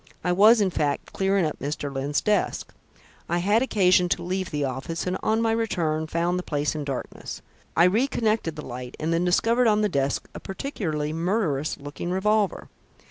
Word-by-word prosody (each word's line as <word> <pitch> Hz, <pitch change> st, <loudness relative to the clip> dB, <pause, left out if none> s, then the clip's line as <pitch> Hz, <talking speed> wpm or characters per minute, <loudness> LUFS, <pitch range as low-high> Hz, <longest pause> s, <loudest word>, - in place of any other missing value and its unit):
I 180 Hz, -, +1 dB
was, 215 Hz, +5 st, +6 dB
in 195 Hz, -2 st, +2 dB
fact, 145 Hz, -4 st, -2 dB
clearing 195 Hz, -2 st, +2 dB
up 155 Hz, -, -3 dB
Mr. 145 Hz, 0 st, -4 dB
Lyne's 140 Hz, +2 st, -1 dB
desk. 210 Hz, -1 st, 0 dB, 0.6 s
I 175 Hz, -, +1 dB
had 205 Hz, +6 st, +2 dB
occasion 185 Hz, -7 st, +3 dB
to 175 Hz, -, 0 dB
leave 185 Hz, +1 st, -2 dB
the 145 Hz, -1 st, -1 dB
office, 135 Hz, +6 st, -4 dB
and 180 Hz, 0 st, -1 dB
on 220 Hz, +1 st, +1 dB
my 225 Hz, -, +2 dB
return 165 Hz, -9 st, 0 dB
found 170 Hz, +3 st, 0 dB
the -, -, -2 dB
place 145 Hz, -4 st, -1 dB
in 155 Hz, -1 st, -4 dB
darkness. 135 Hz, -3 st, -6 dB, 0.3 s
I 170 Hz, -, +6 dB
re 215 Hz, +9 st, +4 dB
connected 215 Hz, -, 0 dB
the 150 Hz, -, -7 dB
light, 125 Hz, 0 st, -7 dB
and 160 Hz, +2 st, 0 dB
then 170 Hz, +2 st, +1 dB
discovered 230 Hz, +7 st, +3 dB
on 215 Hz, -1 st, +3 dB
the 210 Hz, -, +2 dB
desk 140 Hz, -4 st, -1 dB
a -, -, -7 dB
particularly 160 Hz, -, -3 dB
murderous 165 Hz, -4 st, 0 dB
looking 145 Hz, +4 st, -6 dB
revolver. 205 Hz, +2 st, +1 dB
175 Hz, 190 wpm, -25 LUFS, 150-210 Hz, 0.6 s, was